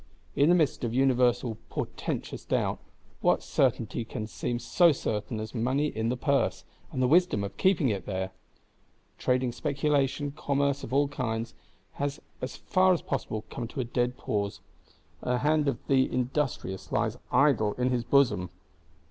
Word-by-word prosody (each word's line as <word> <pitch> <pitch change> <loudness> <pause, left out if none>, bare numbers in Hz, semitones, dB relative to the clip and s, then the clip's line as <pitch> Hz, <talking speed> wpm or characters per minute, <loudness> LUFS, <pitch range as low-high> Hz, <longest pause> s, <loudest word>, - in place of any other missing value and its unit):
In 145 +3 +4
the 175 - +6
midst 155 -7 +1
of 120 0 -1
universal 125 -3 +2
portentous - - -4
doubt, - - 0 0.4
what - - +2
certainty 120 - 0
can 110 -1 -5
seem 120 +2 -3
so 170 +8 +4
certain 110 -4 -2
as 110 0 -6
money 130 +5 +1
in 110 -2 -2
the 125 - -1
purse, 100 -10 +1 0.3
and 130 - -1
the - - +4
wisdom 170 - +4
of 100 - -5
keeping 185 -8 +3
it 100 -4 -3
there? 95 -1 -2 0.9
Trading 125 -1 +1
Speculation, 145 +1 0
Commerce 140 -1 0
of - - -7
all 140 +2 +3
kinds, 115 -4 -3 0.5
has 145 0 -1 0.2
as 130 - -4
far 185 0 +3
as 175 - -2
possible 110 -5 -3
come 120 - -4
to 135 - -7
a - - +1
dead 120 +1 -1
pause; 100 -1 -2 0.6
and 125 - -1
the - - +1
hand 150 +2 +2
of 140 - +1
the 130 -1 +3
industrious 125 -7 -2
lies 115 +1 0
idle 125 -5 +4
in 125 +1 0
his 120 -2 0
bosom. 120 -8 +3
125 Hz, 165 wpm, -28 LUFS, 115-140 Hz, 0.9 s, the